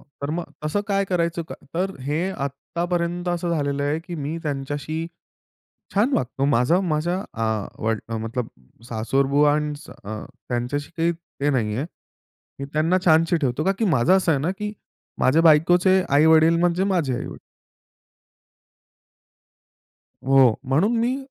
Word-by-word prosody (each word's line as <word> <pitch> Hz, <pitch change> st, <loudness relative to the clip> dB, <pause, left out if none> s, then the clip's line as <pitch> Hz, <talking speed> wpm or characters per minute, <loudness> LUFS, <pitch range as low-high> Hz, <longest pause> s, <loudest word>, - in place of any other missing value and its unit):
तर 140 Hz, 0 st, -7 dB
मग 170 Hz, +2 st, -2 dB, 0.2 s
तसं 160 Hz, +7 st, 0 dB
काय 195 Hz, -1 st, +2 dB
करायचं? 170 Hz, -2 st, -1 dB
का 160 Hz, -, -9 dB, 0.2 s
तर 185 Hz, +3 st, 0 dB
हे 150 Hz, +8 st, -1 dB
आत्तापर्यंत 170 Hz, +4 st, -3 dB
असं 175 Hz, 0 st, -1 dB
झालेलं 140 Hz, -3 st, -1 dB
आहे 145 Hz, +2 st, 0 dB
की 175 Hz, +1 st, -8 dB
मी 150 Hz, +1 st, -4 dB
त्यांच्याशी 145 Hz, +2 st, -3 dB, 0.9 s
छान 220 Hz, +8 st, +2 dB
वागतो. 130 Hz, +2 st, -1 dB
माझा 140 Hz, +5 st, +3 dB
माझ्या 175 Hz, 0 st, 0 dB, 0.2 s
अ, 115 Hz, -, -2 dB, 0.4 s
वड, 110 Hz, 0 st, +1 dB
अ, 115 Hz, -, -3 dB
मतलब 115 Hz, +2 st, -3 dB, 0.4 s
सासरबुआ 135 Hz, +6 st, +2 dB, 0.5 s
अ, 110 Hz, +1 st, -6 dB, 0.2 s
त्यांच्याशी 125 Hz, +4 st, -2 dB
काही 165 Hz, +1 st, +2 dB
ते 160 Hz, -4 st, -4 dB
नाहीये. 120 Hz, -1 st, 0 dB, 0.7 s
मी 140 Hz, -, -4 dB
त्यांना 160 Hz, +4 st, +2 dB
छानशी 165 Hz, +1 st, +4 dB
ठेवतो. 140 Hz, -1 st, -1 dB
का 195 Hz, -, +3 dB
की 225 Hz, -, +1 dB
माझं 180 Hz, -, +4 dB
असं 180 Hz, -3 st, +2 dB
आहे 140 Hz, -, 0 dB
ना 160 Hz, +5 st, 0 dB
की 210 Hz, 0 st, -3 dB, 0.5 s
माझ्या 155 Hz, +6 st, +3 dB
बायकोचे 175 Hz, +4 st, +5 dB
आई-वडील 160 Hz, +3 st, +5 dB
म्हणजे 175 Hz, +2 st, +2 dB
माझे 175 Hz, -10 st, 0 dB
आई-वडील. -, -, -6 dB, 2.9 s
हो. 135 Hz, -4 st, +6 dB
म्हणून 190 Hz, -, +2 dB
मी 240 Hz, +3 st, +1 dB
155 Hz, 140 wpm, -23 LUFS, 135-175 Hz, 2.9 s, हो